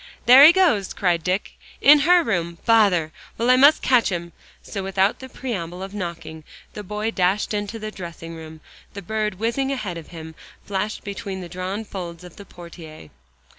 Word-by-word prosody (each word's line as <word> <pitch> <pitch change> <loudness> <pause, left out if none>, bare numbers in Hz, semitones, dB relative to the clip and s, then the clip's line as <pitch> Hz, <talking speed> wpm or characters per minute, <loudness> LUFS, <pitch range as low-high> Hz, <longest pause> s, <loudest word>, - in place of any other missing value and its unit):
"There 255 +3 +9
he 310 - +10
goes!" 320 - +1
cried 175 -3 0
Dick, 185 +3 -2 0.3
"in 295 +1 +7
her 355 -1 +6
room. 170 - -2
Bother! 200 -9 +3 0.3
Well, 235 +2 +2
I - - +6
must 285 +4 +5
catch 250 -3 +3
him." 170 -1 -5 0.3
So 200 - -6
without 195 +1 0
the 260 - -10
preamble 190 -9 -6
of 195 +1 -8
knocking, 170 -5 -7 0.3
the 210 - -7
boy 210 +2 -4
dashed 195 +1 0
into 205 +2 -4
the 215 -1 -6
dressing 170 -3 -9
room. 160 -1 -11 0.3
The 200 - -7
bird 215 +1 -2
whizzing 235 +6 -1
ahead 205 -10 -4
of 160 - -13
him, 160 -2 -10 0.3
flashed 205 +2 -3
between 195 -2 -6
the 175 - -9
drawn 185 +5 -5
folds 175 -4 -8
of 180 -2 -13
the 200 - -11
portiere. 165 - -13
195 Hz, 180 wpm, -22 LUFS, 170-220 Hz, 0.3 s, he